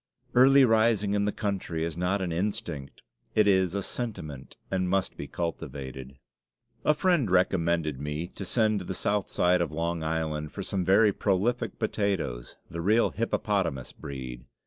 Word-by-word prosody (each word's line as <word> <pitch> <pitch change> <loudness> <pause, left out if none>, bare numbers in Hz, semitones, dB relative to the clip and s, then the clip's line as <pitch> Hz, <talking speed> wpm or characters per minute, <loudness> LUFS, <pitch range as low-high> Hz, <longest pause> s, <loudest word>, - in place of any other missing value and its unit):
Early 135 +2 +7
rising 110 -3 +3
in 100 0 +1
the 105 - +1
country 95 -7 -2
is 85 -2 -4
not 90 +3 0
an 90 - -2
instinct; 90 -6 -3 0.3
it 105 -1 +5
is 95 -2 +3
a 100 - -1
sentiment, 75 - -6
and 95 -1 0
must 95 0 0
be - - -6
cultivated. 65 -6 -5 0.7
A 150 - +4
friend 170 - +2
recommended 85 -5 +2
me 75 +3 -3
to 100 - -8
send 110 +1 +2
to 90 - -7
the 95 - -4
south 105 +1 0
side 90 0 +3
of 85 - -1
Long 85 +1 -2
Island 80 -1 -2
for - - -5
some 95 -2 -1
very 100 +3 +5
prolific 105 +6 0
potatoes 100 - -2
the 85 - -5
real 110 +6 +3
hippopotamus 95 - -1
breed. 65 -4 -7
95 Hz, 160 wpm, -28 LUFS, 80-105 Hz, 0.7 s, Early